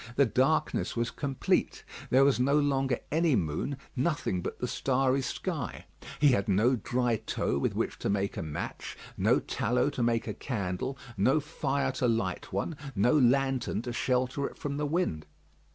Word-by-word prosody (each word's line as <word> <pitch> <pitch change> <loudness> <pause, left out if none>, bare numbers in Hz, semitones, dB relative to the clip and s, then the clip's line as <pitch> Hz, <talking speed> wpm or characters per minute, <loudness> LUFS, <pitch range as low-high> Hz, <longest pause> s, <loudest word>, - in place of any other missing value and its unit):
The 140 - +5
darkness 135 +6 +1
was 115 0 -1
complete. 140 -3 -1 0.3
There 130 +2 +5
was 140 -3 +3
no 140 +4 +3
longer 135 -3 +1
any 160 -2 +3
moon; 85 - -1 0.2
nothing 130 - 0
but - - -5
the - - -2
starry 135 0 +1
sky. 130 - -4 0.3
He 145 0 +6
had 100 -7 +2
no 110 +7 +4
dry 120 +1 0
tow 70 - -1
with - - -1
which - - -2
to - - -2
make 100 0 0
a - - -3
match, 75 -2 -5 0.2
no - - +3
tallow 125 +5 0
to 140 - -4
make 115 -1 +1
a - - -3
candle, 105 +2 -3 0.2
no 130 +10 +3
fire 140 -2 -1
to 130 -1 0
light 110 -6 -1
one, 100 - -2 0.2
no 105 +7 +3
lantern 135 -4 +2
to 120 - -4
shelter 130 +3 0
it - - -12
from 140 -1 -4
the 150 0 -1
wind. 145 - -1
130 Hz, 170 wpm, -29 LUFS, 115-140 Hz, 0.3 s, He